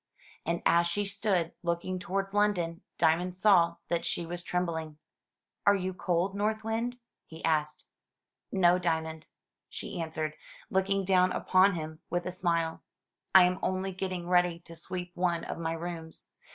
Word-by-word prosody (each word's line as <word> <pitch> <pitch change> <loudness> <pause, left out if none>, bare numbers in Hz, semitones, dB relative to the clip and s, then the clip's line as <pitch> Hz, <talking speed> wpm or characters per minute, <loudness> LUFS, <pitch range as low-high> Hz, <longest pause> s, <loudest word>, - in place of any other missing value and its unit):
And 170 0 -1
as 170 0 +4
she 205 +4 -1
stood 195 -4 0
looking 175 +1 -2
towards 195 +1 -2
London, 185 -5 +1 0.2
Diamond 175 +2 +2
saw 180 -4 +5
that 170 -1 0
she 170 - -1
was 175 +1 -4
trembling. 165 -4 -2 0.7
"Are 200 - +5
you 185 -1 -2
cold. 180 +1 0
North 215 +2 -1
Wind?" 230 +3 -2 0.3
he 160 0 -7
asked. 150 -2 0 0.7
"No, 180 -2 +4
Diamond," 160 -2 -2 0.4
she - - -5
answered, 160 -1 -3 0.4
looking 195 +1 +1
down 185 -1 +4
upon 185 +1 +4
him 155 -1 -6
with 175 0 -1
a 180 - -2
smile; 170 -2 0 0.5
"I 190 - +11
am 180 +1 +2
only 190 +1 -1
getting 185 -2 -4
ready 180 -1 +3
to 165 -1 -12
sweep 180 +1 -4
one 175 -2 0
of - - -5
my 165 0 -1
rooms. 165 -1 -7
175 Hz, 150 wpm, -30 LUFS, 165-190 Hz, 0.7 s, I